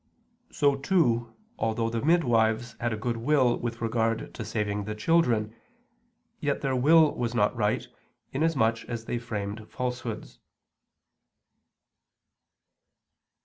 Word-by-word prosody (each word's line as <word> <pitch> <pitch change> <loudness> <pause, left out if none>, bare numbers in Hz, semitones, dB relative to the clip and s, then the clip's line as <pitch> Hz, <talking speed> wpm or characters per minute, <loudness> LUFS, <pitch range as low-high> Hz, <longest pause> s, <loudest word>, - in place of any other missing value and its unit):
So, 140 -1 +2
too, 120 -8 +1 0.2
although 115 +1 0
the 115 -1 -2
midwives 120 -8 +2
had 120 0 -1
a 110 - -2
good 115 +2 -2
will 125 0 +3
with 120 0 -4
regard 115 0 -1
to 115 - -6
saving 105 -1 -2
the 105 0 -4
children, 115 -5 +2 0.8
yet - - -1
their 135 -1 0
will 155 +4 +5
was 120 -1 -3
not 105 +1 +2
right, 105 -2 0 0.4
inasmuch 135 -7 +1
as 115 -2 -5
they 120 - -2
framed 110 -2 -5
falsehoods. 125 -3 -5
115 Hz, 115 wpm, -27 LUFS, 110-130 Hz, 0.8 s, will